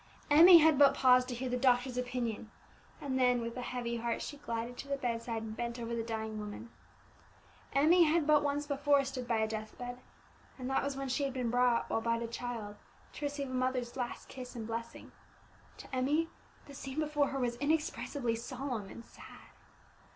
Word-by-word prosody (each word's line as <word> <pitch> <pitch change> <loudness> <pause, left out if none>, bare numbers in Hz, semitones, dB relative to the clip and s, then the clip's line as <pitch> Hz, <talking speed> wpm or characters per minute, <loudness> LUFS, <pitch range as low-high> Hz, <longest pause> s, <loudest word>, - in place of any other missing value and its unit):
Emmie 340 +4 +10
had 315 -3 +5
but 280 -1 +7
paused 255 -1 +5
to 250 - -4
hear 255 +2 -3
the 250 - -1
doctor's 250 0 +2
opinion, 245 -3 -3 0.5
and 260 -2 -2
then, 250 -1 +4
with 230 0 -4
a 250 - -4
heavy 240 -1 -3
heart, 235 0 -2
she 290 - -6
glided 235 -3 -4
to 280 - -8
the 280 0 -1
bedside 230 -3 -3
and 220 -1 -6
bent 235 +1 -4
over 235 0 -4
the 230 - -1
dying 220 -1 -4
woman. 210 +3 -7 1.0
Emmie 330 +5 +5
had 320 0 +2
but 300 -1 +5
once 290 0 -1
before 285 0 +2
stood 255 -2 -5
by 230 - +1
a 220 0 +1
death 215 0 -6
bed, 245 0 -6 0.6
and 255 -2 -5
that 270 - +1
was 280 -1 -3
when 275 0 -3
she 260 +3 -1
had 275 -2 -1
been 250 -3 -2
brought, 245 -1 +2
while 225 - -1
but 230 0 0
a - - -2
child, 230 -3 -5 0.4
to 295 - -5
receive 285 -2 -3
a - - -5
mother's 255 -1 -1
last 245 -2 -4
kiss 255 -1 -9
and 225 -2 -5
blessing. 230 +1 -6 0.7
To - - -8
Emmie 295 +6 +1 0.4
the 285 - -12
scene 270 0 -7
before 300 -2 +1
her 275 - -4
was 240 -2 -1
inexpressibly 285 -4 -1
solemn 240 -3 -5
and 230 - -10
sad. - - -14
250 Hz, 200 wpm, -32 LUFS, 235-280 Hz, 1.0 s, Emmie